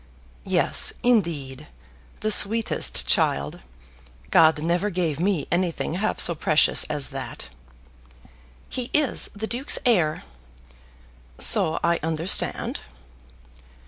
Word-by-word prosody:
"Yes, -, -, +2 dB
indeed. 155 Hz, -, -1 dB, 0.5 s
The 215 Hz, -, -1 dB
sweetest 220 Hz, +2 st, +1 dB
child! 70 Hz, +1 st, -1 dB, 0.7 s
God 160 Hz, -1 st, +3 dB
never 175 Hz, +5 st, -1 dB
gave 170 Hz, -6 st, -3 dB
me 180 Hz, -3 st, -1 dB
anything 175 Hz, -2 st, -2 dB
half 200 Hz, +5 st, -3 dB
so 170 Hz, -, +4 dB
precious 155 Hz, -1 st, +2 dB
as 145 Hz, -2 st, -3 dB
that." 130 Hz, -, -8 dB, 1.2 s
"He 250 Hz, -2 st, -6 dB
is 295 Hz, -5 st, +1 dB
the 210 Hz, +2 st, -5 dB
Duke's 245 Hz, +5 st, +2 dB
heir." 175 Hz, -11 st, +1 dB, 1.1 s
"So 160 Hz, -, +4 dB
I 170 Hz, 0 st, +1 dB
understand." 165 Hz, +3 st, 0 dB
170 Hz, 100 wpm, -23 LUFS, 155-210 Hz, 1.2 s, so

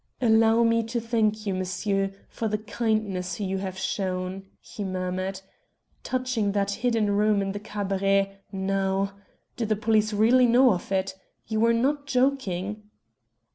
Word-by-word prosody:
"Allow 225 Hz, -1 st, +4 dB
me 230 Hz, 0 st, +3 dB
to 230 Hz, +2 st, -3 dB
thank 220 Hz, -2 st, 0 dB
you, 200 Hz, -, 0 dB
M'sieu', 195 Hz, +2 st, -1 dB, 0.2 s
for 225 Hz, -, -3 dB
the 210 Hz, 0 st, 0 dB
kindness 210 Hz, -4 st, -2 dB
you 195 Hz, -1 st, -2 dB
have 190 Hz, -1 st, -5 dB
shown," 190 Hz, 0 st, -3 dB
he 210 Hz, -, -8 dB
murmured. 185 Hz, 0 st, -3 dB, 0.6 s
"Touching 255 Hz, -5 st, -1 dB
that 200 Hz, -1 st, 0 dB
hidden 225 Hz, -2 st, +1 dB
room 210 Hz, 0 st, +3 dB
in 195 Hz, 0 st, -1 dB
the 205 Hz, -, -5 dB
Cabaret, 195 Hz, -1 st, 0 dB
now. 195 Hz, 0 st, -1 dB, 0.4 s
Do 230 Hz, -, -1 dB
the 215 Hz, -, +2 dB
police 215 Hz, 0 st, +2 dB
really 235 Hz, +4 st, +4 dB
know 245 Hz, 0 st, +5 dB
of 180 Hz, +1 st, -6 dB
it? 190 Hz, 0 st, 0 dB, 0.3 s
You 220 Hz, -1 st, -2 dB
were 230 Hz, +1 st, +4 dB
not 280 Hz, +5 st, 0 dB
joking?" 215 Hz, -7 st, -1 dB
205 Hz, 145 wpm, -26 LUFS, 195-225 Hz, 0.6 s, know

